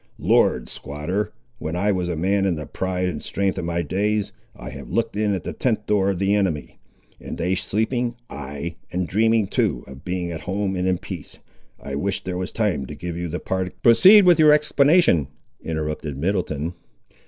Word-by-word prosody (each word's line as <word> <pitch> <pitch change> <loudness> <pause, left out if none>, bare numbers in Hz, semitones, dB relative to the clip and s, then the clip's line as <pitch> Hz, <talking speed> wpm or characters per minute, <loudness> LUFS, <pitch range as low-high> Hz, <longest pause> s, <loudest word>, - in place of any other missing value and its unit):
Lord, - - +2
squatter, 75 +9 -3 0.3
when 80 +2 -4
I 100 +4 +2
was 90 -2 -1
a 85 - -1
man 95 +4 +1
in 90 - +1
the 75 -1 -5
pride 90 +2 -2
and 80 -5 -3
strength 95 -1 -1
of 85 - -3
my 85 0 -1
days, 105 +5 0 0.2
I - - -8
have - - -9
looked 115 -1 -1
in 105 -1 +1
at 90 - -5
the - - -4
tent 110 -4 -1
door 100 -2 +2
of 95 - -1
the 100 +2 +1
enemy, 95 -8 -1 0.4
and - - -7
they 90 +2 0
sleeping, 120 +5 -1
ay, 70 +4 -6
and 90 0 -1
dreaming 110 +4 +3
too, - - 0
of 65 +2 -12
being 90 -1 -3
at 80 -2 -5
home 95 +3 -2
and 90 0 -1
in 90 -1 +2
peace! 85 -3 -8 0.4
I 70 - -7
wish 95 +8 -1
there 90 -1 -4
was 90 +1 -3
time 100 - -1
to - - -7
give 85 -1 -5
you 85 +1 -3
the 85 +2 -4
partic—" 95 -1 -3
"Proceed 190 - +8
with 175 -2 +6
your 155 -1 +7
explanation," 150 - +4 0.4
interrupted 75 -3 -3
Middleton. 85 -2 -1
95 Hz, 195 wpm, -23 LUFS, 85-105 Hz, 0.4 s, Proceed